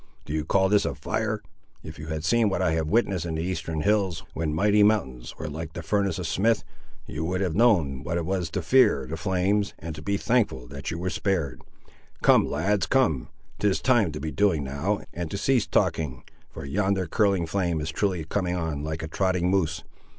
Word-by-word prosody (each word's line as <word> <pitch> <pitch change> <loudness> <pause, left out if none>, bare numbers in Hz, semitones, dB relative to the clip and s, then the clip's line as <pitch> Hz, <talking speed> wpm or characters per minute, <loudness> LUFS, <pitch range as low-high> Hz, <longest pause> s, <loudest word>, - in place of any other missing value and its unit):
Do 75 - -5
you 80 -1 0
call 95 -1 +3
this 105 +1 +3
a - - -2
fire? - - -2 0.4
If - - -9
you 75 - -7
had 80 -1 -3
seen 115 +2 +3
what 95 - -1
I 90 -3 +2
have 80 -1 0
witnessed 100 -3 +1
in 80 - -3
the 80 - -2
Eastern 85 -3 -3
hills, 100 -5 +1
when 80 -1 -2
mighty 105 +7 +3
mountains 65 - +1
were 80 - -5
like 80 +1 -6
the 85 - -6
furnace 100 +2 0
of 90 - -4
smith, 110 +7 +1 0.4
you 80 - -5
would 90 +2 -1
have 90 -4 0
known 85 - +3
what 85 - -2
it 85 - -2
was 90 -3 -1
to 90 +2 -3
fear 95 - +4
the 75 - -5
flames, 95 +5 0
and 80 0 -6
to 75 - -8
be 100 +4 -1
thankful 110 - +1
that 70 +2 -6
you 85 - -3
were 90 +2 -2
spared! 80 -13 -1 0.6
Come, - - +5
lads, 95 +7 0
come; 120 - +1 0.3
'tis 100 -2 +2
time 120 -9 +3
to 75 - -5
be 80 +1 -4
doing 95 -7 +2
now, 70 +10 -2
and 85 -2 -4
to 100 - -4
cease 125 +2 +2
talking; 65 -6 0 0.3
for - - -8
yonder 95 +4 0
curling 95 0 +2
flame 85 -1 -1
is 75 +1 -3
truly 90 -1 -1
coming 90 +1 -1
on 80 -4 -3
like 80 +1 -4
a - - -3
trotting 90 +1 0
moose. 80 -5 0
90 Hz, 210 wpm, -26 LUFS, 80-100 Hz, 0.6 s, Come